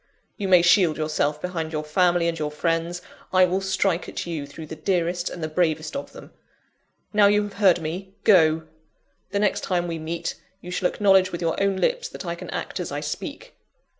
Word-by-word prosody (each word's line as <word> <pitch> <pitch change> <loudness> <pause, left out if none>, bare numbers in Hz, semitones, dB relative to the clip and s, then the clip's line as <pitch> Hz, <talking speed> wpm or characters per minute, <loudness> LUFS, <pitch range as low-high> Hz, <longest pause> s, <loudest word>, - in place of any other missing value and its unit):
You 200 -3 -3
may 180 -2 +6
shield 175 -2 +4
yourself 155 -1 0
behind 165 -2 -4
your 155 -1 -2
family 175 +2 +2
and 165 -1 -2
your 150 -1 -1
friends 165 +3 -2 0.3
I 185 0 +6
will 185 +2 -1
strike 190 -2 0
at - - -5
you 160 -5 -4
through 155 +3 -9
the 160 - -8
dearest 175 +1 -1
and 175 - -7
the - - 0
bravest 155 -1 0
of 280 - -5
them! - - -12 0.8
Now 205 -1 +6
you 210 +1 +3
have 205 -1 -6
heard 185 -4 +5
me, 190 +5 -5
go! 160 -5 +5 0.7
The 200 - -2
next 205 0 +1
time 175 -2 0
we 165 -1 -4
meet, 165 +1 -4 0.2
you 180 -2 -9
shall 180 0 +1
acknowledge 190 -2 +3
with 170 - -4
your 165 - +1
own 195 -1 +1
lips 485 - 0
that - - -8
I - - -2
can - - -9
act - - -4
as - - -4
I - - -2
speak. - - -6
175 Hz, 205 wpm, -24 LUFS, 160-190 Hz, 0.8 s, may